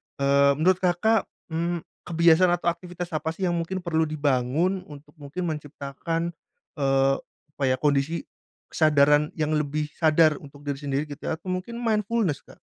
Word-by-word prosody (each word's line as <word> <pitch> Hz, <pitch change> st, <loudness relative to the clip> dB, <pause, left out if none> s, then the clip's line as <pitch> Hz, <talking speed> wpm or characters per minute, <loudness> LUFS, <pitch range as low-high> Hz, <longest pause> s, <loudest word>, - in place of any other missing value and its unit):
Eee, 140 Hz, 0 st, +4 dB
menurut 180 Hz, +5 st, +3 dB
Kakak, 190 Hz, +5 st, +2 dB, 0.2 s
mmm, 170 Hz, +1 st, -1 dB, 0.2 s
kebiasaan 170 Hz, +1 st, +4 dB
atau 175 Hz, 0 st, 0 dB
aktivitas 175 Hz, 0 st, -7 dB
apa 160 Hz, +1 st, -2 dB
sih 190 Hz, -, -5 dB
yang 180 Hz, -, +2 dB
mungkin 180 Hz, +2 st, -3 dB
perlu 160 Hz, -2 st, +1 dB
dibangun 150 Hz, +5 st, +1 dB
untuk 145 Hz, 0 st, -13 dB
mungkin 145 Hz, +6 st, -5 dB
menciptakan, 155 Hz, +2 st, -3 dB, 0.5 s
eee, 135 Hz, 0 st, +3 dB, 0.4 s
apa 145 Hz, -, -4 dB
ya 130 Hz, -, +3 dB
kondisi 145 Hz, +4 st, 0 dB, 0.5 s
kesadaran 150 Hz, -1 st, +4 dB
yang 155 Hz, -1 st, -1 dB
lebih 150 Hz, 0 st, -1 dB
sadar 155 Hz, -2 st, +4 dB
untuk 145 Hz, 0 st, -14 dB
diri 140 Hz, -1 st, -3 dB
sendiri 140 Hz, 0 st, -1 dB
gitu 145 Hz, -, -8 dB
ya 160 Hz, -, 0 dB
atau 175 Hz, +3 st, -15 dB
mungkin 185 Hz, +6 st, -4 dB
mindfulness 215 Hz, -, 0 dB
Kak? -, -, -17 dB
155 Hz, 155 wpm, -25 LUFS, 145-175 Hz, 0.5 s, Eee